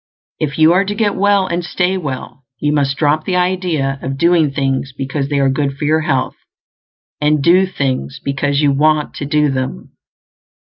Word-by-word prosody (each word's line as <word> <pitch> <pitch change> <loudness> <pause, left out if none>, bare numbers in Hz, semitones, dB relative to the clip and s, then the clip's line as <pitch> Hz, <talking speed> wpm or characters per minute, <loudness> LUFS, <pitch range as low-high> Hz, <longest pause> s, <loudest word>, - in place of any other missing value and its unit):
If 145 -3 -2
you 160 +1 +5
are 185 +2 +3
to 205 +1 -4
get 210 -2 +1
well 200 0 +2
and 175 0 -2
stay 180 +2 0
well, 140 -5 -6
you 150 +4 0
must 140 -2 0
drop 155 0 +1
the 185 - -2
idea 180 -7 0
of 135 +1 -4
doing 170 -1 +3
things 135 0 -2
because 140 +1 -3
they 145 - 0
are 135 -1 +3
good 140 0 -1
for 150 - -3
your 155 +2 +2
health, 135 -5 -1 0.8
and 150 -1 +2
do 185 +4 +4
things 135 -5 -3
because 140 +1 -1
you 145 -2 +3
want 150 +2 +1
to 145 - -4
do 150 -1 +2
them. 130 - -4
150 Hz, 185 wpm, -16 LUFS, 135-175 Hz, 0.8 s, you